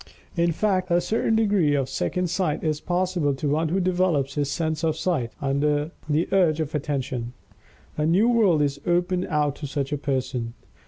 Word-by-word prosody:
_In 170 -1 +2
fact, 185 +1 0
a 175 0 +4
certain 220 +5 0
degree 200 -9 +3
of 135 -2 0
second 180 +6 -2
sight 175 -5 -1
is 155 -2 -1
possible 175 -5 0
to 145 +2 -3
one 155 +2 +1
who 185 +4 +1
develops 175 -7 +1
his 145 -1 -1
sense 155 +2 -2
of 160 -1 +1
Sight, 160 -8 -1
under 145 +2 0 0.2
the 150 +3 +1
urge 175 -5 +3
of 155 -1 -3
Attention._ 130 -5 -3 0.7
A 150 - +2
new 190 +8 +4
world 205 -11 +4
is 140 0 -2
opened 180 +1 +1
out 150 -3 0
to 145 - -5
such 140 +1 -3
a 145 - -2
person. 130 -4 -2
155 Hz, 180 wpm, -24 LUFS, 145-180 Hz, 0.7 s, a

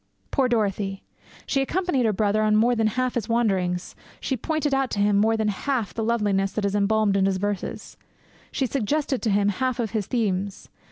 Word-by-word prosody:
Poor 265 -3 +2
Dorothy! 200 -4 -1 0.4
She 275 - +1
accompanied 280 -4 0
her - - +3
brother 210 +1 +1
on 215 0 +3
more 235 +3 +4
than 225 -2 +2
half 255 +3 -1
his 235 -3 -3
wanderings; 190 -6 0 0.2
she 265 - -2
pointed 300 +3 -1
out 270 -1 +1
to 205 - -3
him 205 0 +3
more 220 +2 +3
than 215 -1 +1
half 225 -1 -2
the 225 - -3
loveliness 205 -4 +1
that 215 - -1
is 200 - 0
embalmed 205 0 +2
in 195 -1 +3
his 190 -1 0
verses; 205 0 -4 0.5
she 270 - 0
suggested 275 +2 -1
to 225 - 0
him 205 0 +2
half 255 +4 -1
his 215 -4 -2
themes. 200 -4 -2
215 Hz, 190 wpm, -24 LUFS, 200-250 Hz, 0.5 s, more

